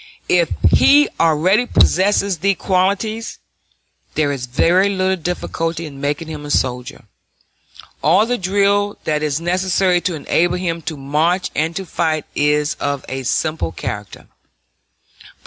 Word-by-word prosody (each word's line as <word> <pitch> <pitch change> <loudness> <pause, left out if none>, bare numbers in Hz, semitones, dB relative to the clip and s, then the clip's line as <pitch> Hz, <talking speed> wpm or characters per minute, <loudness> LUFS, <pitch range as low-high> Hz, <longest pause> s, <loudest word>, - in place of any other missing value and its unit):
If - - +3 0.2
he 290 +1 +5
already 175 +9 +3
possesses 195 -3 +2
these 195 +3 +1
qualities, 200 +4 -1 0.8
there 150 -2 +1
is 130 -3 -4
very 175 +10 +3
little 190 -1 0
difficulty 165 -1 -3
in 140 -3 -10
making 145 +3 -2
him 155 -2 -7
a 145 - -8
soldier; 125 -2 -2 1.0
all 170 +9 +4
the 245 +1 -1
drill 200 +2 +1
that 150 -1 -1
is 150 -1 -1
necessary 180 +1 +1
to 175 -1 -2
enable 170 +4 0
him 170 -2 -3
to 155 - -7
march 155 +7 0
and 160 +2 -1
to 195 - -4
fight 160 -3 -1
is 150 0 +1
of 140 -2 -3
a 135 0 -4
simple 140 - -1
character. - - -7
170 Hz, 135 wpm, -18 LUFS, 150-190 Hz, 1.0 s, he